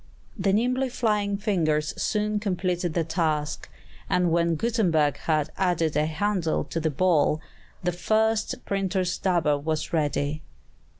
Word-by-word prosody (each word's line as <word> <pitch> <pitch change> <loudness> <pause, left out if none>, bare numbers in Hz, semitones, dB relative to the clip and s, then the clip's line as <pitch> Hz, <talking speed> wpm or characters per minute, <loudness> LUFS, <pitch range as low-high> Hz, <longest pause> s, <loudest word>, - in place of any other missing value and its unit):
The 195 -2 +1
nimbly 250 +5 +1
flying 210 -4 0
fingers 160 -8 0
soon 210 0 0
completed 180 -4 -1
the 170 - +2
task; 155 -2 -1 0.4
and 180 -2 +2
when 170 0 +2
Gutenberg 170 - +1
had 155 -1 0
added 175 -4 +1
a 150 +1 +2
handle 175 0 0
to 165 - -4
the 160 0 0
ball, 155 0 +2 0.4
the 180 - +1
first 220 +4 0
printer's 190 -2 0
dabber 170 -6 +2
was 155 +2 -3
ready. 150 -1 0
175 Hz, 130 wpm, -26 LUFS, 155-205 Hz, 0.4 s, the